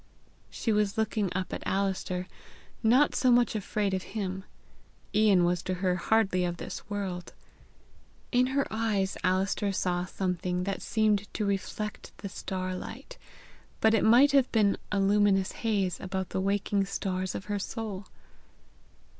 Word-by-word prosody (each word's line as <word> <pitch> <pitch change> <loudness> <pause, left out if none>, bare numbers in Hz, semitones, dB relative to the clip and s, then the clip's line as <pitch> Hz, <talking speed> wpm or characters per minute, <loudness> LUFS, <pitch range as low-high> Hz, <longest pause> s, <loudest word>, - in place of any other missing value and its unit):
She 225 - -2
was 210 0 +1
looking 215 -2 0
up 185 0 -2
at - - -4
Alister, 190 -2 -1 0.6
not 250 +6 +4
so 255 - +2
much 240 -1 +4
afraid 205 -1 -1
of 185 - 0 0.2
him; 190 -1 -3 0.7
Ian 205 -4 +5
was 175 0 +1
to 185 0 -2
her 180 0 0
hardly 195 -2 +2
of 175 -1 -2
this - - -7
world. 190 -4 -4 1.0
In 250 0 +3
her 275 +1 +1
eyes 215 -4 0
Alister 190 +2 +1
saw 180 -2 0
something 180 -1 -2
that 195 +1 -3
seemed 210 -2 +1
to 215 - 0
reflect 200 +1 -4
the 200 - -6
starlight; 185 +7 -5 0.6
but 220 0 +4
it 225 - +3
might 250 +6 +6
have 275 -2 +3
been 210 -3 +3 0.2
a 205 - +1
luminous 195 -1 +3
haze 200 -6 -1
about 190 -1 -3
the 190 - -2
waking 200 0 +1
stars 185 -1 -3
of 190 - -5
her 205 -1 -2
soul! 205 -2 -5
200 Hz, 145 wpm, -29 LUFS, 185-215 Hz, 1.0 s, might